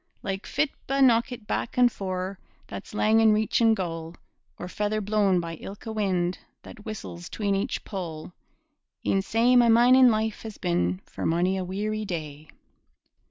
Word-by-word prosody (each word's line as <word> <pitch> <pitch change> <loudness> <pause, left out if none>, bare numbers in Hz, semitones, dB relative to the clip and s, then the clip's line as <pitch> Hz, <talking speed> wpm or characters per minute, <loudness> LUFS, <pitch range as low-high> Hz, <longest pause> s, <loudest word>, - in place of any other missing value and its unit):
Like 195 0 -4
fitba' 275 -2 0
knockit 240 -2 +2
back 230 - -3
and 245 -1 +5
fore, 185 -1 -4 0.3
That's 205 - -9
lang 220 +1 +3
in 220 -1 +5
reachin' 220 +1 +3
goal, 165 -3 -5 0.4
Or 180 - -6
feather 210 +3 -1
blown 205 -3 +2
by 165 -1 -5
ilka 205 +6 -8
wind 185 -4 -1 0.2
That 215 - -12
whistles 175 -5 -7
'tween 205 -2 -1
each 200 +6 -2
pole 175 -4 -6 0.7
E'en 195 - +2
sae 230 +5 +2
my 240 -1 +6
mining 250 +2 +6
life 220 -1 -1
has 220 -2 -8
been 90 +2 -1
For - - -8
mony 175 +3 +1
a 190 - -2
weary 210 +4 -3
day. 155 -5 -6
205 Hz, 155 wpm, -26 LUFS, 180-225 Hz, 0.7 s, my